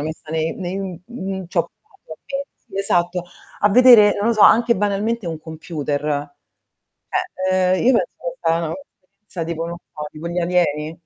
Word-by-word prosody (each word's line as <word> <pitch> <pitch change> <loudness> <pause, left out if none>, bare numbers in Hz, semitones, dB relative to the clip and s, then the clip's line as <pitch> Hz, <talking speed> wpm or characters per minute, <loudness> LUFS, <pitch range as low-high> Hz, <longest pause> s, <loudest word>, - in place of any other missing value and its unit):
messa 155 +1 -6
ne 160 0 -1
nei 185 0 -4 0.3
n 190 -6 -5
c'ho - - -1 0.2
provato 390 - -14
eh, 275 0 -3
sì 195 - -10
esatto, 180 -2 0 0.4
a 205 - +5
vedere, 230 -2 +7
non 205 +3 0
lo - - +3
so, 215 - -1
anche 235 +3 +6
banalmente 205 +2 -1
un 165 -2 -4
computer. 150 -2 -4 1.2
Cioè 185 0 +3
ehm, - - -1
io 260 - +6
penso - - +1
che - - -5
è - - -18
stata 165 - +2
una 155 - -3 0.5
esperienza, 180 -5 -5
tipo 165 0 -3
non 170 0 -5 0.2
so 150 - -6
tipo 155 +2 -6
gli 175 +1 -3
alieni. 170 -3 0
180 Hz, 180 wpm, -20 LUFS, 160-210 Hz, 1.2 s, vedere